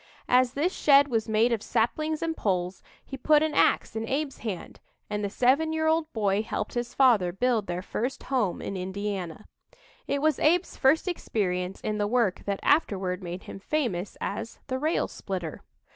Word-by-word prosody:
As 250 Hz, 0 st, +4 dB
this 330 Hz, +7 st, 0 dB
shed 285 Hz, -1 st, +5 dB
was 225 Hz, -3 st, -1 dB
made 220 Hz, +3 st, +3 dB
of 225 Hz, -, -1 dB
saplings 305 Hz, +9 st, 0 dB
and 325 Hz, -1 st, -1 dB
poles, 185 Hz, -, -1 dB, 0.2 s
he 270 Hz, -, -7 dB
put 300 Hz, +3 st, +4 dB
an 315 Hz, -1 st, 0 dB
ax -, -, +2 dB
in 220 Hz, 0 st, -2 dB
Abe's 280 Hz, 0 st, -2 dB
hands, 205 Hz, -6 st, -6 dB, 0.3 s
and 210 Hz, 0 st, -2 dB
the 200 Hz, -, -1 dB
seven 265 Hz, +9 st, +2 dB
year 315 Hz, 0 st, 0 dB
old 320 Hz, 0 st, +1 dB
boy 205 Hz, -2 st, +1 dB
helped 215 Hz, -1 st, -4 dB
his 240 Hz, 0 st, -3 dB
father 230 Hz, -10 st, +4 dB
build 225 Hz, +2 st, 0 dB
their 175 Hz, +1 st, -3 dB
first 245 Hz, +7 st, -3 dB
"home" 240 Hz, -10 st, -1 dB
in 195 Hz, -, -4 dB
Indiana. 190 Hz, -1 st, -4 dB, 0.6 s
It 280 Hz, -, 0 dB
was 310 Hz, -1 st, +2 dB
Abe's 350 Hz, +4 st, +2 dB
first 300 Hz, +7 st, +3 dB
experience 190 Hz, -, -2 dB
in 215 Hz, 0 st, -2 dB
the 205 Hz, -, +1 dB
work 225 Hz, -4 st, +1 dB
that 200 Hz, -1 st, -2 dB
afterward 195 Hz, -, +1 dB
made 180 Hz, +1 st, -6 dB
him -, -, -9 dB
famous 200 Hz, -, -2 dB
as 225 Hz, +3 st, -4 dB
"the 260 Hz, -1 st, -3 dB
rail 310 Hz, +4 st, +1 dB
splitter." 180 Hz, -5 st, -5 dB
225 Hz, 180 wpm, -27 LUFS, 195-285 Hz, 0.6 s, shed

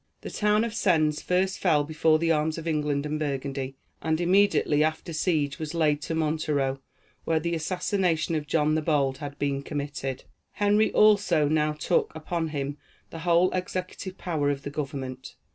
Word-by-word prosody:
The -, -, -7 dB
town 210 Hz, +1 st, +2 dB
of 230 Hz, -2 st, -3 dB
Sens 155 Hz, -8 st, +2 dB
first 185 Hz, +1 st, 0 dB
fell 155 Hz, -6 st, +3 dB
before 155 Hz, +1 st, +2 dB
the 165 Hz, +1 st, +1 dB
arms 155 Hz, 0 st, +1 dB
of 165 Hz, 0 st, -6 dB
England 150 Hz, -2 st, 0 dB
and 150 Hz, +1 st, -2 dB
Burgundy, 135 Hz, -2 st, -3 dB, 0.3 s
and 160 Hz, 0 st, 0 dB
immediately 175 Hz, -4 st, +3 dB
after 160 Hz, +2 st, -2 dB
siege 155 Hz, -3 st, 0 dB
was 155 Hz, +1 st, -5 dB
laid 150 Hz, -3 st, +2 dB
to 165 Hz, -, -3 dB
Montereau, 150 Hz, -4 st, 0 dB, 0.4 s
where 160 Hz, -1 st, +1 dB
the 170 Hz, +2 st, -2 dB
assassination 170 Hz, 0 st, 0 dB
of 150 Hz, -2 st, -2 dB
John 150 Hz, 0 st, +2 dB
the 155 Hz, -, +1 dB
Bold 140 Hz, -4 st, +1 dB
had 145 Hz, -1 st, -7 dB
been 140 Hz, -1 st, -1 dB
committed. 140 Hz, -2 st, -4 dB, 0.3 s
Henry 210 Hz, +1 st, +2 dB
also 200 Hz, -8 st, +4 dB
now 155 Hz, 0 st, +1 dB
took 150 Hz, -, 0 dB
upon 160 Hz, +1 st, -2 dB
him 145 Hz, -1 st, -4 dB, 0.3 s
the 165 Hz, -, -7 dB
whole 175 Hz, +2 st, +3 dB
executive 185 Hz, +1 st, -4 dB
power 155 Hz, -5 st, -1 dB
of 140 Hz, 0 st, -2 dB
the 145 Hz, -, -5 dB
government. 135 Hz, -3 st, -5 dB
155 Hz, 170 wpm, -26 LUFS, 145-170 Hz, 0.4 s, also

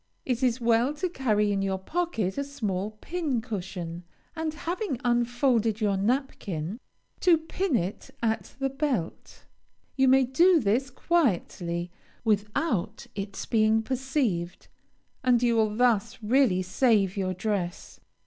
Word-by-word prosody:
It 250 Hz, -1 st, -1 dB
is 250 Hz, -1 st, +2 dB
well 235 Hz, +4 st, +2 dB
to 355 Hz, +5 st, -2 dB
carry 215 Hz, -9 st, +1 dB
in 200 Hz, -1 st, 0 dB
your 195 Hz, -1 st, 0 dB
pocket 225 Hz, -, -2 dB
a -, -, 0 dB
small 215 Hz, -7 st, -3 dB
pincushion, 210 Hz, -, -3 dB, 0.3 s
and, 320 Hz, -1 st, -2 dB
having 335 Hz, -, -3 dB
unfolded 240 Hz, -2 st, +2 dB
your 205 Hz, -3 st, +1 dB
napkin, 200 Hz, -, -2 dB, 0.4 s
to 350 Hz, -3 st, +5 dB
pin 320 Hz, 0 st, -2 dB
it 185 Hz, 0 st, -2 dB
at 225 Hz, -1 st, -1 dB
the 270 Hz, 0 st, -1 dB
belt. 270 Hz, -, -3 dB, 0.5 s
You 265 Hz, -1 st, +3 dB
may 265 Hz, +1 st, +6 dB
do 335 Hz, +8 st, +4 dB
this 245 Hz, +4 st, +1 dB
quietly, 180 Hz, -, 0 dB, 0.3 s
without 210 Hz, -, 0 dB
its 200 Hz, 0 st, -5 dB
being 220 Hz, -1 st, +3 dB
perceived, 250 Hz, -, -2 dB, 0.5 s
and 250 Hz, -2 st, +3 dB
you 235 Hz, -1 st, +3 dB
will 215 Hz, -2 st, +2 dB
thus 235 Hz, -4 st, +2 dB
really 215 Hz, -5 st, +3 dB
save 195 Hz, -1 st, +2 dB
your 185 Hz, -2 st, -1 dB
dress. 180 Hz, -3 st, -3 dB
230 Hz, 130 wpm, -27 LUFS, 200-270 Hz, 0.5 s, may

